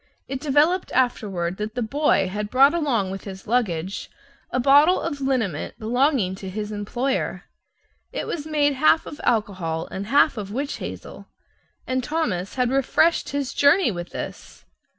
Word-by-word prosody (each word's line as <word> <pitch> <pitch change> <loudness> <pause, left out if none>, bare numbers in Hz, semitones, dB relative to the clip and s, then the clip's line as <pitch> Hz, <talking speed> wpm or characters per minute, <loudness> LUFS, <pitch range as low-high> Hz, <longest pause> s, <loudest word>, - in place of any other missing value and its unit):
It 270 0 -4
developed 305 +6 +2
afterward 195 -8 0
that 215 +1 -5
the 245 - -1
boy 280 -3 +2
had 205 +2 -4
brought 270 +5 +5
along 250 - 0
with 195 0 -7
his 190 -1 -8
luggage 195 -6 -1 0.4
a 255 - -1
bottle 290 +7 +5
of 290 -4 -4
liniment 230 - -1
belonging 240 -3 +1
to 190 -1 -7
his 210 +2 -5
employer. 240 +6 -2 0.7
It - - -4
was 310 -2 -4
made 295 -2 +2
half 310 +4 +3
of 300 +1 -9
alcohol 185 -8 -1
and 195 +2 -5
half 280 +2 +4
of 200 -2 -5
witch 275 +6 -3
hazel; - - -8 0.6
and 255 0 -1
Thomas 235 - -2
had 250 -1 +1
refreshed 275 +5 +2
his 280 -2 -3
journey 285 0 +4
with 175 -2 -6
this! - - -8
245 Hz, 155 wpm, -23 LUFS, 200-285 Hz, 0.7 s, brought